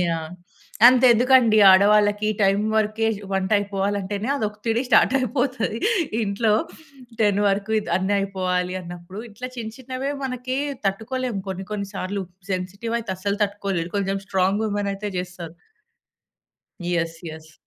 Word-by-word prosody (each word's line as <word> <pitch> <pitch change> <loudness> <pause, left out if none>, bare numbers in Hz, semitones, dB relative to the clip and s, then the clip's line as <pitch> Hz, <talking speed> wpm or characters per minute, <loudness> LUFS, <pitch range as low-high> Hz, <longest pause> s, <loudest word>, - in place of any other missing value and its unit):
Yeah! 165 -1 -3 0.6
అంతెందుకండి, 245 -2 +5
ఆడవాళ్ళకి 205 +2 +4
ఈ - - +1
టైం 195 +1 +3
వరకే, 220 +1 +1
జు 200 -1 -10
వంటయిపోవాలంటేనే, 200 +2 -1
అది 250 -6 -2
ఒతిడి 225 +3 -2
స్టార్టయిపోతది. 255 -1 +2 0.4
ఇంట్లో, 210 +2 +1 0.7
10 205 -2 +3
వరకు 200 +2 0
ఇది 210 - -5
అన్ని 190 +2 0
అయిపోవాలి 185 -2 -1
అన్నప్పుడు 175 +2 -10
ఇట్లా 250 +5 -7
చిన్న 220 -2 -5
చిన్నవే 260 +2 -4
మనకి 255 0 -3 0.3
తట్టుకోలేము, 225 +2 -2
కొన్ని 190 0 -5
కొన్ని 200 -1 -3
సార్లు 195 +1 -3 0.3
సెన్సిటివయితే 200 +4 -3
అస్సలు 200 +2 -2
తట్టుకోలేరు, 195 -4 -3
కొంచెం 195 0 -1
స్ట్రాంగ్ 190 +3 +1
వుమెనయితే 205 -1 -2
జేస్తారు. 180 -2 -7 1.4
యెస్. 165 -1 -1
యెస్. 160 0 -11
205 Hz, 120 wpm, -23 LUFS, 190-225 Hz, 1.4 s, అంతెందుకండి